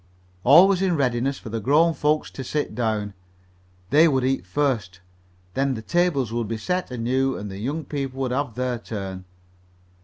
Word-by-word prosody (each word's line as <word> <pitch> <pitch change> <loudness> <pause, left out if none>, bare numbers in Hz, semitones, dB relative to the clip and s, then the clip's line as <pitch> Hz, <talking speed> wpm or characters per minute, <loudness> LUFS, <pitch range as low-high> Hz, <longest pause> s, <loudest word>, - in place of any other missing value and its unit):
All 165 +9 +8
was 195 -2 +1
in 185 -3 +2
readiness 130 0 0
for - - -9
the 115 +1 -3
grown 150 +9 +3
folks 150 0 0
to 135 - -7
sit 150 +4 -2
down. 110 -4 -1 0.8
They 155 +4 +6
would 135 -4 +1
eat 135 +1 0
first, 115 -12 -1 0.5
then 135 0 0
the 110 - -7
tables 155 - +1
would 120 -2 -1
be 115 +1 -3
set 180 +10 -2
anew 130 +2 0
and 105 -1 -6
the 95 - -7
young 145 +8 -3
people 135 -2 -4
would 130 -2 -1
have 130 -2 -2
their 125 -1 -2
turn. 95 -5 -6
130 Hz, 180 wpm, -24 LUFS, 115-145 Hz, 0.8 s, All